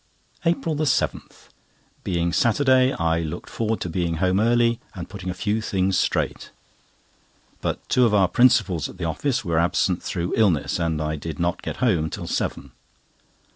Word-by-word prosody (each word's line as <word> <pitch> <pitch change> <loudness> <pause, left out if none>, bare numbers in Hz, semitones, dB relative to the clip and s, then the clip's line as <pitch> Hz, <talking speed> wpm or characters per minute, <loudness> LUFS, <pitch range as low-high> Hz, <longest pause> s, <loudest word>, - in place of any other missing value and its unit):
APRIL 165 -2 0
7.—Being 85 - -3
Saturday, 130 +2 +3
I 85 0 0
looked 85 +1 -5
forward 115 -1 -1
to - - -2
being 85 -1 -1
home 95 +3 +1
early, 115 +1 +3 0.2
and 90 -2 -6
putting 95 -3 -7
a - - -2
few 105 +3 -1
things 95 -2 0
straight; - - -1 1.1
but - - -3
two 125 - +3
of 115 - +2
our 95 -3 +4
principals 115 - +3
at - - -12
the 90 - -3
office 120 - -1
were 85 -2 +1
absent 90 +1 +1
through 85 -1 -3
illness, 90 -8 +2
and 80 -2 -1
I 75 0 -2
did 80 0 -6
not 85 0 -1
get - - -5
home 85 -9 +2
till - - -6
seven. - - -3
95 Hz, 160 wpm, -23 LUFS, 85-115 Hz, 1.1 s, our